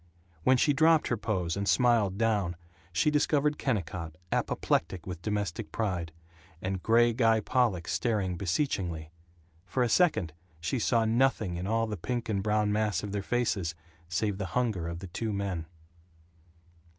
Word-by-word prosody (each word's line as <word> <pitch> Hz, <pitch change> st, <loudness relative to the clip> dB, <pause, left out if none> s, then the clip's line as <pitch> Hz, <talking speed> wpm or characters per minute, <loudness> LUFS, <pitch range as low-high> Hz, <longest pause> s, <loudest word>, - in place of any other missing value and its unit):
When 130 Hz, +6 st, +5 dB
she 145 Hz, +4 st, +3 dB
dropped 160 Hz, +2 st, +4 dB
her 120 Hz, -, +2 dB
pose 95 Hz, -6 st, -1 dB
and 100 Hz, 0 st, -1 dB
smiled 115 Hz, -6 st, +3 dB
down 105 Hz, -6 st, +1 dB, 0.4 s
she 90 Hz, -, +2 dB
discovered 150 Hz, 0 st, +2 dB
Kennicott 90 Hz, -, -2 dB, 0.2 s
apoplectic 85 Hz, 0 st, 0 dB
with 90 Hz, -2 st, -6 dB
domestic 100 Hz, -7 st, -3 dB
pride 90 Hz, -7 st, -2 dB, 0.5 s
and 95 Hz, 0 st, -3 dB
gray 120 Hz, +3 st, +4 dB
Guy 115 Hz, -2 st, +3 dB
Pollock 110 Hz, -7 st, +1 dB
staring 105 Hz, -7 st, 0 dB
beseechingly. 90 Hz, -, -2 dB, 0.5 s
For 95 Hz, +8 st, 0 dB
a 120 Hz, -, +1 dB
second 110 Hz, -, +2 dB, 0.3 s
she 85 Hz, +10 st, -1 dB
saw 115 Hz, 0 st, +2 dB
nothing 110 Hz, -5 st, +2 dB
in 90 Hz, +2 st, -4 dB
all 115 Hz, +1 st, +1 dB
the 105 Hz, -2 st, -4 dB
pink 120 Hz, +6 st, -3 dB
and 100 Hz, -3 st, 0 dB
brown 105 Hz, 0 st, +1 dB
mass 105 Hz, -4 st, 0 dB
of 105 Hz, -, -4 dB
their 100 Hz, 0 st, -2 dB
faces 100 Hz, -7 st, -1 dB, 0.3 s
save 95 Hz, +3 st, -1 dB
the 100 Hz, -, -2 dB
hunger 110 Hz, -9 st, 0 dB
of 85 Hz, +1 st, -5 dB
the 95 Hz, -, -6 dB
two 110 Hz, +5 st, -3 dB
men. 95 Hz, -5 st, -3 dB
105 Hz, 155 wpm, -29 LUFS, 90-120 Hz, 0.5 s, When